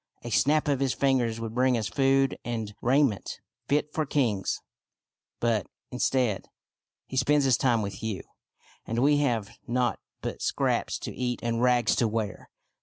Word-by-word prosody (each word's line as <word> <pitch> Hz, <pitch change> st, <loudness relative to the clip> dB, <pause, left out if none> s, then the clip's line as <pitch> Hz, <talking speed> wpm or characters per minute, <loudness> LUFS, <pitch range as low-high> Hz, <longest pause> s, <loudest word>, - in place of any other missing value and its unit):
A 120 Hz, -, -6 dB
snap 150 Hz, +6 st, +3 dB
of 140 Hz, -3 st, +1 dB
his 135 Hz, -2 st, +1 dB
fingers 125 Hz, -5 st, +1 dB
would 115 Hz, -1 st, -5 dB
bring 125 Hz, 0 st, +3 dB
us 110 Hz, -3 st, -1 dB
food 135 Hz, +6 st, +2 dB
and 110 Hz, -3 st, -4 dB
rai 135 Hz, +5 st, +4 dB
ment 110 Hz, -8 st, -2 dB, 0.3 s
fit 150 Hz, +1 st, 0 dB
for 155 Hz, -, +1 dB
kings; 120 Hz, -9 st, 0 dB, 0.8 s
but, 115 Hz, -5 st, +1 dB, 0.2 s
instead, 125 Hz, -7 st, 0 dB, 0.6 s
he -, -, -8 dB
spends 140 Hz, +2 st, +3 dB
his 130 Hz, -2 st, +5 dB
time 120 Hz, -3 st, +2 dB
with 100 Hz, -1 st, -5 dB
you, 110 Hz, -4 st, -3 dB, 0.6 s
and 115 Hz, -, -4 dB
we 145 Hz, +4 st, +4 dB
have 115 Hz, -6 st, -1 dB
nought 125 Hz, 0 st, 0 dB, 0.2 s
but -, -, -5 dB
scraps -, -, 0 dB
to -, -, -6 dB
eat 125 Hz, -1 st, -2 dB
and 115 Hz, 0 st, 0 dB
rags 125 Hz, -3 st, +3 dB
to 120 Hz, -, +3 dB
wear. 110 Hz, -2 st, -3 dB
125 Hz, 165 wpm, -27 LUFS, 115-135 Hz, 0.8 s, his